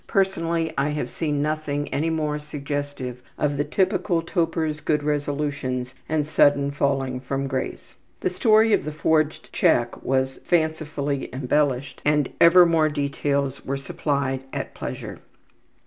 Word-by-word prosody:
Personally 165 -4 0
I 140 +2 +1
have 150 0 -3
seen 150 -3 -1
nothing 150 -1 -2
any 160 +3 0
more 155 -2 -1
suggestive 145 -3 -5 0.2
of 145 -1 0
the 145 - +1
typical 175 +1 +1
toper's 165 -3 -1
good 150 -1 0
resolutions 140 -3 -2 0.2
and 155 -1 +1
sudden 140 -2 +3
falling 135 -2 0
from 135 +1 -3
grace. 130 -1 -4 0.3
The - - 0
story 220 +3 +4
of - - +3
the 155 - -4
forged 155 0 0
check 120 0 +2
was 130 0 0
fancifully 155 -4 -1
embellished 135 +1 0
and 150 -2 +2
ever 175 +1 +8
more 160 -2 +3
details 140 -1 -1
were 135 +1 -2
supplied 135 -1 -2
at - - -4
pleasure. - - -6
145 Hz, 135 wpm, -24 LUFS, 140-155 Hz, 0.3 s, ever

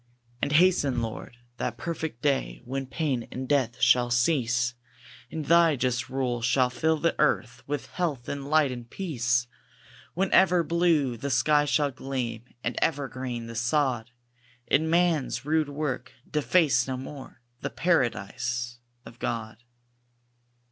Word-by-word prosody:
And 145 - 0
hasten, 150 -6 +4
Lord, 115 +1 -6 0.2
that 120 -1 -3
perfect 160 -7 -5
day, - - 0
When 135 +1 -4
pain 135 -4 -2
and 130 +1 -5
death 130 -4 +1
shall 120 -1 +4
cease; 120 -1 +2 0.6
And 155 -2 -5
Thy 170 0 +5
just 125 -2 -1
rule 125 -2 -1
shall 125 +2 +2
fill 160 +5 +1
the 165 +2 +1
earth 125 -4 +1
With 145 -1 -3
health, 150 -9 -3
and 140 0 -5
light, 155 -3 +4
and 120 -2 -7
peace. 125 -9 0 0.7
When 190 +2 0
ever 180 -2 +5
blue 160 -7 +2
the 140 +5 -4
sky 145 +4 +3
shall 145 0 +1
gleam, 125 -3 -4 0.2
And 120 - -2
ever 145 -3 +1
green 125 -3 -5
the 115 - -8
sod; 120 -1 0 0.6
And 160 +3 +2
man's 165 -6 +1
rude 155 -1 +1
work 140 -3 -3 0.2
deface 150 -5 +2
no 130 -1 -2
more 135 -1 -9 0.2
The - - -3
Paradise 120 - -1 0.3
of 120 - -13
God. 110 -3 -3
135 Hz, 140 wpm, -27 LUFS, 120-155 Hz, 0.7 s, Thy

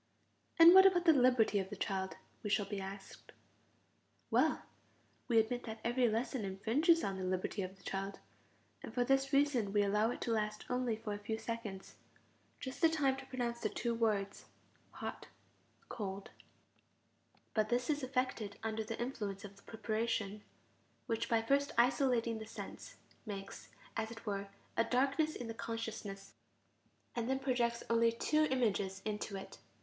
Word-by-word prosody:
And 335 +1 +10
what 380 +1 +10
about 355 -2 +2
the 325 - +8
liberty 250 -6 +4
of 190 -1 -3
the 205 - -5
child, 190 -1 -2 0.3
we 210 - -3
shall 205 0 +2
be 200 0 -4
asked? 195 0 -9 1.0
Well, - - +3 0.6
we 235 - +3
admit 225 +2 +2
that 220 -1 -6
every 240 0 +2
lesson 230 +2 -1
infringes 230 - +3
the 195 - -1
liberty 185 +1 -2
of 190 +1 -5
the - - -21
child, 195 +1 -3 0.6
and - - -7
for 245 - +3
this 270 +1 +2
reason 275 -7 +3
we 205 0 +3
allow 210 +2 +2
it - - -4
to 235 - -1
last 210 -1 -1
only 250 -2 +1
for 215 -1 -5
a 205 - -5
few 220 +2 -3
seconds: 220 -4 -6 0.6
just 260 -1 -6
the 330 - +7
time 285 -5 +2
to 270 0 -9
pronounce 240 -2 -2
the 215 - -1
two 235 +2 -1
words: 210 -4 0 0.4
hot, - - -6 0.6
cold; 195 -2 -5 1.2
but 215 -1 +1
this 245 0 +1
is 295 -1 0
effected 255 -5 -2
under 220 0 -1
the 225 +1 -5
influence 210 -5 -3
of 200 0 -10
the 200 - -18
preparation, 215 -2 -2 0.6
which 225 -2 -1
by 225 -1 +3
first 280 +4 +2
isolating 240 -2 +3
the 220 - -8
sense - - -8 0.3
makes, 195 -2 -7 0.3
as 220 -1 -1
it 225 0 -10
were, 200 -1 -2 0.3
a 230 - +4
darkness 275 +6 +1
in 245 - -5
the 225 - -4
consciousness, 225 -3 -5 0.8
and 235 0 -1
then 265 - +2
projects 245 -3 0
only 230 0 +4
two 305 +7 +2
images 200 -8 0
into 210 -1 -3
it. 195 - -9
225 Hz, 165 wpm, -35 LUFS, 205-255 Hz, 1.2 s, And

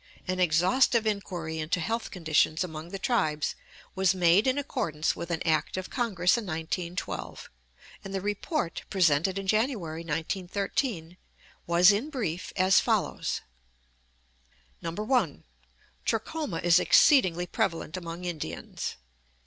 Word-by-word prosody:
An 185 0 -1
exhaustive 185 +8 +3
inquiry 175 -6 -3
into 155 +3 -1
health 225 +7 -2
conditions 160 -2 +1
among 160 -1 -7
the 195 - -5
tribes 155 -8 0 0.4
was 190 0 +2
made 180 +5 +4
in 260 +1 +2
accordance 155 - -1
with 170 - -6
an 170 -1 -2
act 160 +1 +1
of 185 - -5
Congress 210 -5 +2
in - - -5
1912, 170 +2 -4 0.5
and 195 - -7
the 195 - -1
report 205 - -2
presented 180 0 +2
in 195 - -4
January, 215 - 0
1913, 180 - -2 0.5
was 175 +3 +6
in 220 +9 -1
brief 200 - -3
as 185 0 +5
follows: - - 0 1.4
1. 210 - -1 0.6
Trachoma 225 - -2
is 175 0 +6
exceedingly 185 - +5
prevalent 165 -2 -2
among 170 0 -6
Indians. 155 - -5
180 Hz, 120 wpm, -28 LUFS, 165-210 Hz, 1.4 s, was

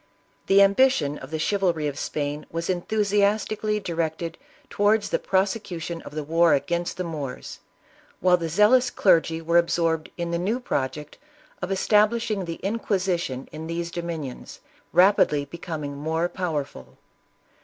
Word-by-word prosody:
The 200 +1 +7
ambition 200 - +3
of 130 - -10
the 160 - -3
chivalry 175 -3 0
of 145 0 -4
Spain 145 0 -3
was 165 +2 -4
enthusi 205 +3 0
astically 210 +1 0
directed 165 -2 -3 0.3
towards 205 +1 +1
the - - +1
prosecution 190 -4 -1
of - - -11
the 155 - -2
war 165 +2 +4
against 170 +5 -2
the 185 - -2
Moors, 150 -6 -6 0.6
while 180 0 +5
the 165 -2 -3
zealous 220 +8 +4
clergy 165 -5 +2
were 170 +1 +4
ab 170 - +1
sorbed 165 -2 0
in 170 -1 -3
the 170 - 0
new 210 +8 -1
project 150 - -3 0.4
of 180 +1 -3
establishing 210 +1 +2
the 165 -1 -6
Inquisi 195 -4 0
tion 130 -5 -5
in 160 +1 -7
these 170 0 -3
dominions, 165 -6 -6 0.3
rapidly 180 -5 +4
becoming 150 -2 -6 0.3
powerful. 150 - -4
170 Hz, 145 wpm, -25 LUFS, 160-200 Hz, 0.6 s, The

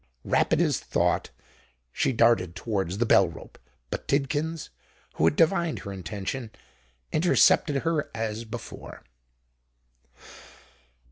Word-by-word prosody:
Rapid - - +2
as - - +1
thought, - - 0 0.6
she - - 0
darted 115 -7 +3
towards 95 -5 -2
the 120 - +1
bell 95 -4 +5
rope: 85 - -12 0.3
but - - -5
Tidkins, 145 +3 -1 0.5
who 80 - +3
had 80 - +3
divined 170 -1 +2
her 100 - -5
intention, 100 +7 -5 0.6
intercepted 155 -3 +3
her 165 -3 0
as 110 0 -3
before. 115 0 -9
115 Hz, 110 wpm, -26 LUFS, 100-150 Hz, 0.6 s, bell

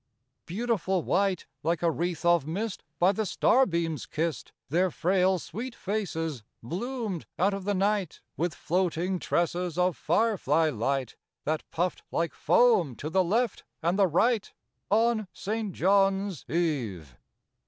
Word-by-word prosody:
Beautiful 190 -3 0
white, 195 -1 +1 0.2
Like 165 +2 0
a 170 - +4
wreath 175 +1 -3
of 170 -4 +4
mist 200 +5 -3
by 180 +2 +4
the 205 - -2
starbeams 170 - +2
kissed, 160 -1 -3 0.2
Their 180 +6 +2
frail, 185 +3 +2
sweet 230 +9 -6
faces 165 - -3 0.2
bloomed 210 - -4
out 195 +3 +2
of 195 -1 -5
the 205 0 +1
night, 200 -2 0 0.2
With 170 -1 -1
floating 180 +1 0
tresses 175 0 -1
of 180 -2 +2
firefly 165 - +2
light, 130 +2 -2 0.3
That 155 +1 -1
puffed 175 +2 -1
like 165 -2 -1
foam 175 - +3
to 155 +6 -5
the 190 +1 +3
left 225 +7 0 0.2
and 175 +4 +1
the 195 - +6
right, 215 +6 +2 0.4
On 220 0 +2
St. 215 0 -3
John's 195 -1 +2
Eve. 120 - -1
180 Hz, 135 wpm, -28 LUFS, 165-200 Hz, 0.4 s, the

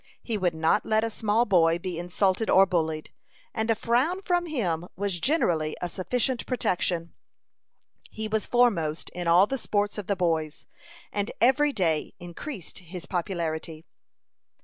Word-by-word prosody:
He 230 - -2
would 180 -5 0
not 160 0 +2
let 220 0 +1
a 225 - -1
small 220 +2 +1
boy 170 -5 +4
be 175 -1 -5
insulted 185 +4 0
or 190 +1 +7
bullied; 160 -4 -1 0.4
and 220 0 -2
a 225 - +4
frown 255 - +1
from 350 -1 +1
him 175 - -1
was 195 -2 -2
generally 170 - +1
a 175 - -2
sufficient 240 +8 -1
protection. 175 -8 -1 1.0
He 220 0 -5
was 215 0 -1
foremost 185 -11 +1
in 175 -1 -5
all 175 +3 +6
the 270 +5 -3
sports 205 -1 -1
of 205 - -7
the 200 - +1
boys, 165 -4 -1 0.5
and 205 +1 -1
every 285 +5 +4
day 165 - 0
increased 175 - -7
his 180 -1 -9
popularity. 165 -3 -3
190 Hz, 150 wpm, -27 LUFS, 170-225 Hz, 1.0 s, or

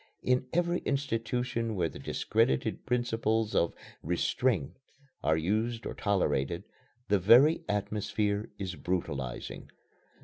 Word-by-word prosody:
In 125 0 +2
every 175 +1 +1
institution 125 -4 -1
where 90 -3 +1
the - - -9
discredited 65 - 0
principles 115 -3 0
of 85 - +2 0.3
"Restraint" 90 - 0 0.5
are 80 - +3
used 110 +8 -1
or - - -3
tolerated, 85 -5 0 0.5
the 100 -1 +4
very 125 - +6
atmosphere 105 0 -1
is 95 -2 -4
brutalizing. 70 -10 -4
105 Hz, 105 wpm, -30 LUFS, 90-120 Hz, 0.5 s, very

